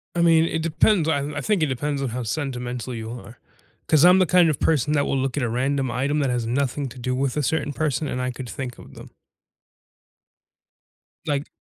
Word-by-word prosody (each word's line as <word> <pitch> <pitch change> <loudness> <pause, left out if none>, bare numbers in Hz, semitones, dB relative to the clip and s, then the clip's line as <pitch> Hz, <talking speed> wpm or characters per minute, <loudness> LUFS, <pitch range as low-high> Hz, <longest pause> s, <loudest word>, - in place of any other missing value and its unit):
I 170 - +1
mean, 165 -1 +5
it 160 - -2
depends. 165 +2 +2
I 145 - +2 0.2
I 140 - -2
think 205 -3 +1
it 155 - +2
depends 140 +2 -2
on 135 - -1
how 125 +1 -4
sentimental 125 -1 -4
you 110 0 -6
are 120 -1 -10 0.5
'cause 155 0 +4
I'm 180 +1 +7
the 185 - +4
kind 180 -1 +4
of 150 - -1
person 150 -1 +1
that 145 -1 +2
will 135 - 0
look 135 +1 -2
at 130 - 0
a 120 - 0
random 130 +2 0
item 140 +5 0
that 140 -3 +1
has 120 -2 -1
nothing 135 +2 -1
to 125 +1 -12
do 125 +1 -2
with 135 +1 -1
a 150 - +1
certain 150 0 -1
person, 150 0 -1
and 125 - -3
I 125 0 -1
could 125 -1 -8
think 125 -3 -6
of - - -14
them. - - -12 2.1
Like 145 -1 -1
140 Hz, 220 wpm, -23 LUFS, 125-155 Hz, 2.1 s, I'm